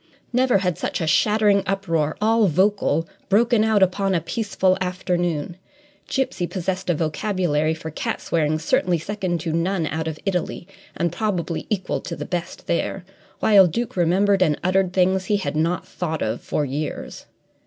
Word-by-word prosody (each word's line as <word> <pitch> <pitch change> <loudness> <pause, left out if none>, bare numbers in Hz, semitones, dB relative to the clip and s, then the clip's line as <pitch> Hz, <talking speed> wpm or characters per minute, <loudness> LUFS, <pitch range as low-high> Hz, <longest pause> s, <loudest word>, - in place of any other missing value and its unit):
Never 250 -3 +3
had 180 -4 -1
such - - -2
a 165 - -1
shattering 210 +4 +3
uproar, 165 -6 0
all 220 0 +3
vocal, 180 -2 +1 0.2
broken 230 +2 +4
out 220 -3 +4
upon 190 +1 +1
a - - +3
peaceful 190 +1 0
afternoon. 175 -3 -1 0.5
Gipsy 260 -10 -1
possessed 185 0 -3
a 175 - +3
vocabulary 160 -1 0
for 160 0 -7
cat - - -3
swearing 155 -2 0
certainly 170 +2 +1
second 185 0 -3
to 160 -1 -2
none 170 +1 0
out 160 +1 -3
of 160 -1 -4
Italy, 180 -2 -2 0.3
and 170 -1 0
probably 180 -6 -2
equal 200 -4 -1
to 170 - -5
the - - -6
best 175 -1 -5
there, 180 +2 -2 0.4
while 200 -4 +6
Duke 235 +9 -3
remembered 190 +3 +3
and 155 -5 +2
uttered 185 0 +2
things 185 0 +2
he 205 +1 +2
had 190 - -3
not 165 +3 0
thought 160 -3 -3
of 110 +2 -2
for 150 - -1
years. 145 +3 -5
180 Hz, 165 wpm, -22 LUFS, 165-200 Hz, 0.5 s, while